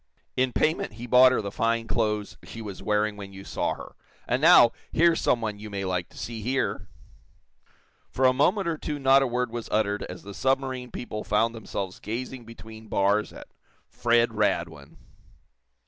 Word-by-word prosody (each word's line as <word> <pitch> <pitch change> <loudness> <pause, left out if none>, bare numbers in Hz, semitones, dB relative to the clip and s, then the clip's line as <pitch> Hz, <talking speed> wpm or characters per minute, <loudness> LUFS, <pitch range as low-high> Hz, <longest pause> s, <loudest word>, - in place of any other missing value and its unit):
In 130 0 +1
payment 155 -2 0
he 115 +3 -8
bought 125 +1 +7
her 125 - +1
the 100 - -4
fine 115 +1 0
clothes 105 -3 -1
she 115 - -10
was 105 -4 -7
wearing 105 0 0
when 100 -1 -9
you 95 0 -10
saw - - -2
her. - - -11 0.3
And 125 +3 0
now, 160 -7 +8 0.2
here's 170 0 +3
some 120 - +2
one 105 -2 -3
you 105 0 -8
may 100 -1 -4
like 90 -1 -2
to - - -18
see 115 -1 -6
here!" 130 +5 -1 1.2
For 130 - 0
a 130 - +6
moment 190 +7 +2
or 160 -2 -2
two 150 -2 -4
not 135 0 +5
a 135 - +1
word 125 0 -1
was 120 -1 -6
uttered 105 -1 0
as 90 0 -9
the 100 - -9
submarine 130 0 -1
people 105 -3 -6
found 110 +2 +1
themselves 100 -4 -5
gazing 125 +2 -5
between 110 -1 -12
bars 100 +1 +1
at - - -12 0.4
Fred 120 0 +2
Radwin. 85 -8 -2
115 Hz, 180 wpm, -26 LUFS, 105-130 Hz, 1.2 s, now